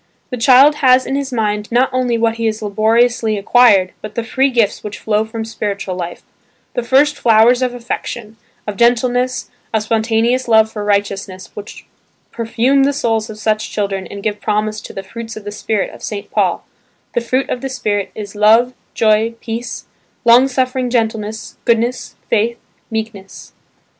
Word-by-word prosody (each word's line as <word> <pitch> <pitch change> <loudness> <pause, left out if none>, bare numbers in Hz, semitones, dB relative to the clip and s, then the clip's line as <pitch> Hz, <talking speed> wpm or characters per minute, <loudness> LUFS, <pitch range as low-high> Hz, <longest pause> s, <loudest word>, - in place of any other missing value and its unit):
The 250 - -3
child 270 +5 +6
has 255 -2 +4
in 270 - -2
his 275 -1 -2
mind 210 -2 -2
not 250 +3 +3
only 250 -2 +1
what 230 0 0
he 230 0 0
has 215 0 -3
laboriously 220 +2 +2
acquired, 200 -3 +4
but 215 0 -8
the 235 - -1
free 265 +4 +1
gifts 235 -5 +1
which 205 -1 -6
flow 215 0 0
from 225 0 -5
spiritual 205 -3 -4
life, 175 -1 -6 0.5
the 245 - -1
first 275 +5 +3
flowers 235 0 +4
of 250 -1 -1
affection, 235 -2 -5 0.3
of 210 -2 -5
gentleness, 245 +1 +1 0.2
of 220 -1 0
spontaneous 225 +3 +1
love 220 -1 +4
for 210 -2 -5
righteousness 200 -2 -2
which 205 +1 -10 0.5
perfume 235 +4 +1
the 280 +1 +3
souls 225 -5 -1
of 215 - -8
such 215 0 -1
children 195 -2 -3
and 200 0 -9
give 210 -1 -2
promise 215 0 -2
of - - -11
the 195 - -5
"fruits 225 +3 -8
of 215 - -8
the 205 - -6
spirit" 210 -1 -2
of - - -13
St. 205 -2 -6
Paul–"The 240 - -3
fruit 255 +3 0
of 245 - -2
the 270 - -3
Spirit 205 -6 -2
is 205 -2 -7
love, 220 +4 +4 0.2
joy, 220 +1 +2
peace, 230 +1 -5 0.4
long 240 +3 +7
suffering 255 -1 -1
gentleness, 220 -2 -2
goodness, 235 +2 0
faith, 230 +1 +1 0.3
meekness." 220 -4 -6
225 Hz, 170 wpm, -17 LUFS, 210-245 Hz, 0.5 s, long